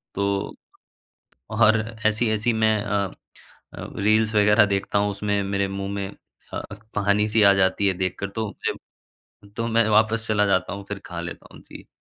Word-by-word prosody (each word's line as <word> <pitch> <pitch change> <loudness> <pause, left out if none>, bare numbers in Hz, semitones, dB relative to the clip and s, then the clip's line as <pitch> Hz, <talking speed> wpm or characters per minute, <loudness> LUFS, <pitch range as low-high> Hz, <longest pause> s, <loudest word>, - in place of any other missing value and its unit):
तो 100 0 -1 1.0
और 110 0 +4 0.3
ऐसी-ऐसी 110 +1 +1
मैं 110 -1 +2
अ 100 -2 -1 0.6
अ, - - -7
रील्स 110 +2 +2
वगैरह 105 0 +5
देखता 100 0 0
हूँ 100 0 +1
उसमें 100 0 -1
मेरे 100 0 -1
मुँह 100 0 -4
में 100 -1 -3 0.5
अ, - - -3 0.3
पानी-सी 105 +2 +2
आ 100 - +7
जाती 95 +1 +2
है 95 - +1
देख 95 0 -1
कर 100 - -3
तो 110 +2 -3
मुझे - - -6 0.6
तो 115 - -1
मैं 115 -1 +2
वापस 110 +1 +2
चला 105 -1 +2
जाता 95 -1 +1
हूँ 100 0 -7
फिर 105 -1 -4
खा 85 -1 -6
लेता 85 0 -8
हूँ। - - -13
जी। - - -13
105 Hz, 170 wpm, -23 LUFS, 100-110 Hz, 1.0 s, आ